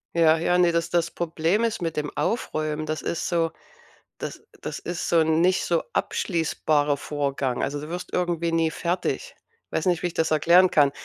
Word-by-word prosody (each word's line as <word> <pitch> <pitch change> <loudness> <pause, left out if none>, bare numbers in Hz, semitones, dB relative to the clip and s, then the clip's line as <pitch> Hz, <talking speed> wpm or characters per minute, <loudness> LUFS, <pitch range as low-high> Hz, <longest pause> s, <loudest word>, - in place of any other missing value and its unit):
Ja, 165 -1 +5
ja, 175 +2 +2
ne, 175 -1 +4
das 170 0 0
das 170 0 +1
Problem 170 +5 0
ist 230 -4 -1
mit 165 -2 -3
dem 150 -1 -2
Aufräumen 155 -8 -1
das 155 -1 -3
ist 170 - -2
so 165 -2 +1 0.7
das - - -7 0.2
das - - -5
ist 175 -1 -4
so 170 - +3
'n 160 0 +3
nicht 185 +1 +3
so 170 -2 +1
abschließbarer 150 -4 0
Vorgang. 140 -3 -2
Also, 145 +1 -2
du 150 +2 -8
wirst 180 +1 -5
irgendwie 170 -2 0
nie 165 -1 +2
fertig. 180 - -2 0.3
Weiß - - -2
nicht, 175 -3 +1
wie - - +2
ich 170 - -7
das 160 - 0
erklären 170 +4 +5
kann. 145 -2 +4
165 Hz, 190 wpm, -25 LUFS, 155-175 Hz, 0.7 s, Ja